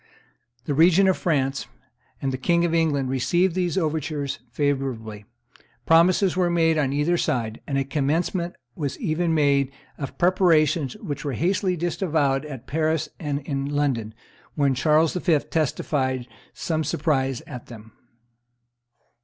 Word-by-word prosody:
The 145 Hz, -, -1 dB
regent 175 Hz, +6 st, +5 dB
of 190 Hz, -, +3 dB
France 140 Hz, -5 st, -1 dB, 0.6 s
and 135 Hz, -1 st, 0 dB
the -, -, -2 dB
King 170 Hz, +4 st, +2 dB
of 170 Hz, -, -1 dB
England 150 Hz, -5 st, +1 dB
received 175 Hz, +8 st, +1 dB
these 180 Hz, 0 st, -1 dB
overtures 155 Hz, -4 st, -2 dB
favorably; 125 Hz, -6 st, -2 dB, 0.6 s
promises 175 Hz, +3 st, +4 dB
were 180 Hz, -1 st, +2 dB
made 165 Hz, -1 st, +3 dB
on 145 Hz, -4 st, +1 dB
either 150 Hz, +5 st, +1 dB
side 115 Hz, -8 st, -1 dB
and 140 Hz, -, -1 dB
a 135 Hz, -, +1 dB
commencement 165 Hz, +5 st, -1 dB, 0.2 s
was 145 Hz, -4 st, -4 dB
even 170 Hz, -5 st, 0 dB
made 140 Hz, -3 st, +2 dB, 0.3 s
of 140 Hz, -2 st, -6 dB
preparations, 165 Hz, -6 st, +3 dB
which 145 Hz, -, -5 dB
were 140 Hz, -, -2 dB
hastily 185 Hz, -, 0 dB
disavowed 155 Hz, -5 st, 0 dB
both 150 Hz, -, -9 dB
at 130 Hz, -4 st, -8 dB
Paris 155 Hz, 0 st, 0 dB
and 145 Hz, -3 st, -2 dB
in 140 Hz, -1 st, -3 dB
London, 135 Hz, -7 st, -1 dB, 0.4 s
when 140 Hz, -3 st, +2 dB
Charles 155 Hz, +4 st, +3 dB
V. 175 Hz, -3 st, +2 dB
testified 135 Hz, -4 st, -1 dB, 0.2 s
some 160 Hz, -1 st, -2 dB
surprise 135 Hz, -5 st, 0 dB
at 125 Hz, -, -9 dB
them. 110 Hz, -2 st, -12 dB
150 Hz, 140 wpm, -24 LUFS, 135-170 Hz, 0.6 s, regent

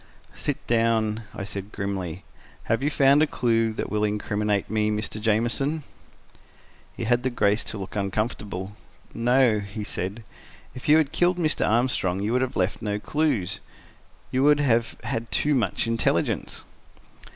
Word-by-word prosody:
"Sit -, -, -3 dB
down," 115 Hz, -1 st, +1 dB
I -, -, -4 dB
said 100 Hz, 0 st, -6 dB
grimly. 95 Hz, -3 st, -4 dB, 0.4 s
"Have 115 Hz, +2 st, 0 dB
you 145 Hz, -, +1 dB
found 140 Hz, 0 st, +5 dB
a 155 Hz, -, +4 dB
clue 115 Hz, -4 st, +1 dB
that -, -, -4 dB
will 105 Hz, 0 st, 0 dB
incriminate 105 Hz, -1 st, 0 dB
me, 110 Hz, 0 st, +1 dB
Mr. 105 Hz, 0 st, -3 dB
Jamieson?" 120 Hz, +8 st, +1 dB, 1.1 s
He -, -, -3 dB
had 120 Hz, +2 st, +2 dB
the 130 Hz, -, 0 dB
grace 105 Hz, -3 st, +1 dB
to -, -, -2 dB
look 95 Hz, +1 st, -7 dB
uncomfortable. 100 Hz, -1 st, -3 dB, 0.4 s
"No," 120 Hz, -1 st, +3 dB
he 100 Hz, +1 st, -6 dB
said. 100 Hz, +2 st, -4 dB, 0.5 s
"If 130 Hz, -, -6 dB
you 155 Hz, -, +8 dB
had 150 Hz, -3 st, +2 dB
killed 180 Hz, 0 st, +2 dB
Mr. 155 Hz, -3 st, +1 dB
Armstrong, 110 Hz, -6 st, +1 dB
you 105 Hz, +3 st, -1 dB
would 125 Hz, -, +2 dB
have 130 Hz, -1 st, -2 dB
left 95 Hz, +2 st, 0 dB
no 105 Hz, -1 st, -1 dB
clues. 135 Hz, -, -1 dB, 0.7 s
You 130 Hz, -, +1 dB
would 145 Hz, +1 st, +5 dB
have 115 Hz, -5 st, +1 dB
had 115 Hz, 0 st, -3 dB
too 150 Hz, -, +1 dB
much 115 Hz, -9 st, +1 dB
intelligence." 115 Hz, 0 st, 0 dB
115 Hz, 155 wpm, -25 LUFS, 105-130 Hz, 1.1 s, you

